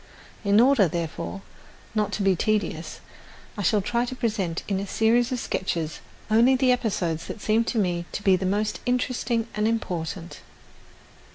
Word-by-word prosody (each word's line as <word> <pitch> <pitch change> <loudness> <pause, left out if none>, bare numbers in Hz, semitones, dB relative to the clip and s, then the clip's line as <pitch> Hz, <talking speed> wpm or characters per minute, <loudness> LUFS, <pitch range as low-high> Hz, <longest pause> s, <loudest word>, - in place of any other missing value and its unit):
In 200 +1 +4
order, 245 -5 +5
therefore, 170 +3 -4 0.5
not 210 -2 0
to 200 - -1
be 195 -1 +4
tedious 215 +3 -1 0.5
I 205 - -4
shall 205 +2 +2
try 235 +4 0
to 255 - -5
present 205 -9 -2
in 195 -2 0
a 200 - -4
series 235 +5 +2
of 255 - -1
sketches 165 -7 -2 0.3
only 235 +4 +5
the 255 0 +3
episodes 180 -9 -1
that - - -6
seem 220 +2 +2
to 235 - -2
me 175 -4 0
to 205 - -4
be 190 -2 +5
the 185 0 -1
most 210 +3 0
interesting 245 -2 0
and 210 0 +1
important. 180 -5 -3
210 Hz, 165 wpm, -25 LUFS, 185-230 Hz, 0.5 s, order